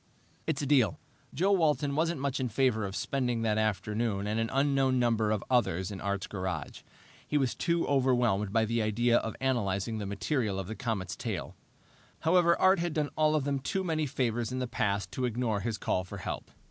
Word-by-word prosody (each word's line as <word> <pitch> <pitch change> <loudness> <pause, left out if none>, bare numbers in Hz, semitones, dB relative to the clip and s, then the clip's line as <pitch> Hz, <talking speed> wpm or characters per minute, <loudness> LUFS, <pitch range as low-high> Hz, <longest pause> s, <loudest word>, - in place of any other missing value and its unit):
"It's 150 -3 -1
a - - 0
deal." 130 - +3 0.3
Joe 190 +7 +1
Walton 150 -6 +2
wasn't 165 0 +1
much 140 -1 -1
in 130 -2 -1
favor 115 -2 +1
of 95 - -7
spending 125 -3 -1
that 110 -1 +1
afternoon 105 0 -1
and 105 +2 -1
an 115 0 0
unknown 135 -1 +2
number 115 -3 +2
of 105 -2 0
others 95 -7 +1
in 95 - -7
Art's 100 -1 -2
garage; 90 -6 -4 0.5
he 150 - +1
was 135 -4 +1
too 170 -1 0
overwhelmed 125 -7 +2
by 110 +1 +3
the 115 +1 0
idea 120 +3 +2
of 110 - -5
analyzing 110 -4 0
the 100 - -4
material 105 +1 -1
of 95 - -3
the 110 - -5
comet's 105 -7 -3
tail. 105 -8 -4 0.7
However 170 +1 +4
Art 190 0 +5
had 170 -2 -2
done 150 -2 0
all 155 0 +3
of 150 - +1
them 140 0 -1
too 190 +8 -2
many 155 -4 0
favors 120 -2 -1
in 130 - -3
the 130 - -1
past 100 -5 -1
to 130 - -1
ignore 120 -3 0
his 110 +1 -2
call 95 -2 0
for 95 +2 -8
help. 95 - -5
120 Hz, 200 wpm, -30 LUFS, 105-140 Hz, 0.7 s, Art